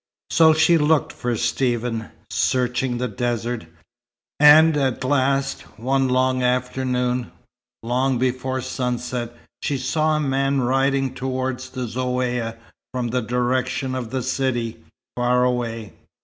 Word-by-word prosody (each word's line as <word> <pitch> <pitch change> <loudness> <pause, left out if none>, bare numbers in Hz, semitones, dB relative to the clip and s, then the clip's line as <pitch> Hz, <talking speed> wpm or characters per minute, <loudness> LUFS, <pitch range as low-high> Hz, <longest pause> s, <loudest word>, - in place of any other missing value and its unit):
So 160 -1 +6
she 160 +1 +4
looked 150 -1 +2
for 120 -1 -2
Stephen, 120 -2 -1 0.2
searching 125 0 0
the 125 +1 -1
desert; 120 -2 -3 0.7
and 155 +2 +7
at 135 -3 0
last, 135 0 +1 0.2
one 130 +3 +1 0.3
afternoon 125 -1 0 0.5
long 125 +2 +1
before 130 +1 -1
sunset, 125 -2 -3 0.3
she 140 - -1
saw 155 +4 +1
a - - 0
man 135 -1 +1
riding 135 +1 +1
toward 130 0 -2
the 130 0 -7
Zaouïa 125 -1 -2 0.3
from 125 -2 -2
the 125 +2 0
direction 125 +2 -1
of 125 -3 -4
the 130 +1 -2
city, 125 -3 -2 0.3
far 125 0 +2
away. 115 -4 -2
125 Hz, 120 wpm, -22 LUFS, 120-135 Hz, 0.7 s, and